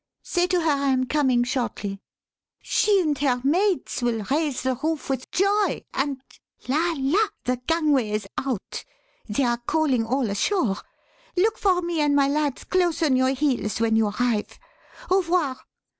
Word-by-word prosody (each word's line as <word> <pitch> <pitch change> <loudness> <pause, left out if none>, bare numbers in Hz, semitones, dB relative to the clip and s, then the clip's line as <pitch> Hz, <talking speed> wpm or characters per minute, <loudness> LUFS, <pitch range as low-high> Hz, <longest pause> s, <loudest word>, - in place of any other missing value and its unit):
Say 355 0 0
to 360 -1 +1
her 320 -1 +2
I 280 -1 0
am 260 -1 +2
coming 260 -4 +2
shortly. 235 -6 -3 0.6
She 410 -2 +2
and 305 -4 0
her 260 -3 +1
mates 360 +2 +1
will 230 -3 -1
raise 295 -3 0
the 260 0 +1
roof 300 +2 -3
with 260 -1 -3
joy, 400 +2 +1
and 270 0 -1 0.5
la! 325 +6 +1
la! 320 +11 +2 0.2
The 250 0 0
gangway 300 -8 +2
is 210 -1 -2
out. 260 -7 -4 0.5
They 210 +7 0
are 240 -1 0
calling 300 -7 +2
all 250 +2 0
ashore. 210 - 0 0.6
Look 435 +5 +2
for 365 -3 +2
me 340 -2 -1
and 290 -1 +2
my 280 -1 +4
lads 290 -1 -1
close 350 -3 +1
on 285 -5 +3
your 260 +1 +2
heels 255 -8 0
when 225 -1 +2
you 220 -1 +3
arrive. 220 0 -1 0.5
Au 375 - +5
revoir." 335 -7 0
275 Hz, 165 wpm, -24 LUFS, 245-330 Hz, 0.6 s, Au